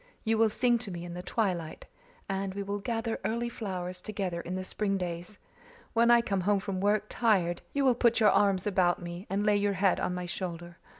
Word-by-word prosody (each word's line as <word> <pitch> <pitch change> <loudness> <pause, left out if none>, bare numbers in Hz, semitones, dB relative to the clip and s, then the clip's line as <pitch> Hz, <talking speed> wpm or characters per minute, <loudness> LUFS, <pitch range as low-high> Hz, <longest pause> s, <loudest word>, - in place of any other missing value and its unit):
You 225 -1 +1
will 225 -1 +5
sing 240 +2 +2
to 220 - -5
me 175 -2 -6
in 175 - -7
the 175 - -5
twilight, 180 -5 -2 0.4
and 195 0 -2
we 200 - -2
will 200 +1 -3
gather 225 +2 -2
early 235 +1 -1
flowers 185 -5 -5
together 190 -5 -3
in 180 +2 -5
the 185 - -3
spring 195 +1 -1
days. 180 +2 -4 0.6
When 235 +1 +4
I 240 0 +7
come 195 -4 -1
home 200 +2 +2
from 190 -1 -4
work, 205 +1 +2
tired, 185 -8 +1
you 280 -1 +1
will 255 - +6
put 235 -1 +3
your 210 -3 +6
arms 195 -2 +3
about 185 -4 +2
me 175 +3 -7
and 200 +2 0
lay 210 -1 +4
your 205 0 +1
head 195 0 +2
on 180 - -1
my 180 0 -4
shoulder. 175 -1 -6
195 Hz, 220 wpm, -29 LUFS, 180-220 Hz, 0.6 s, I